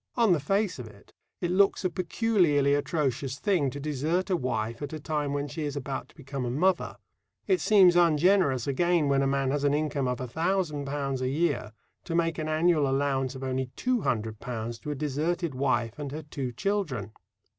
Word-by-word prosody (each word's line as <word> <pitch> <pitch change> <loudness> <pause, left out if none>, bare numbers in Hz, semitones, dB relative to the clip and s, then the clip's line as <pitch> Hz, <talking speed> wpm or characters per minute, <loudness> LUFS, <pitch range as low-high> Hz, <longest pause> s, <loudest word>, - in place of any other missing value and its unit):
On 230 -6 +4
the 165 - +1
face 195 +4 0
of 120 - -6
it, 100 -2 -17 0.3
it 175 -1 0
looks 195 +1 +3
a - - +3
peculiarly 170 -6 +2
atrocious 140 -3 -1
thing 175 -8 +1
to 140 - -7
desert 155 +6 -1
a - - +4
wife 115 -5 -2
at 145 +1 -5
a 155 - -4
time 150 -1 -2
when 145 0 -2
she 160 - -6
is 145 -2 -3
about 135 -1 -4
to - - -22
become 135 -3 -5
a 120 - -2
mother. 175 +8 +1 0.5
It 375 -2 +2
seems 190 -5 +6
ungenerous, 170 -5 +4
again, 165 +2 +2
when 135 -1 +3
a 135 - +2
man 135 -1 +1
has 145 0 -1
an 145 0 +3
income 145 -3 -1
of 125 0 -1
£1,000 145 -2 -2
a 130 - 0
year 150 -6 0 0.3
to 165 - -3
make 165 -1 +1
an 155 - -2
annual 155 -2 +3
allowance 135 -1 0
of 130 - -7
only 130 0 -1
£200 115 - -2
to - - -6
a 145 - -2
deserted 155 +3 -1
wife 125 -2 0
and 145 -2 -4
her 155 +2 -6
two 140 -4 -4
children. 135 - -2
145 Hz, 190 wpm, -28 LUFS, 135-170 Hz, 0.5 s, seems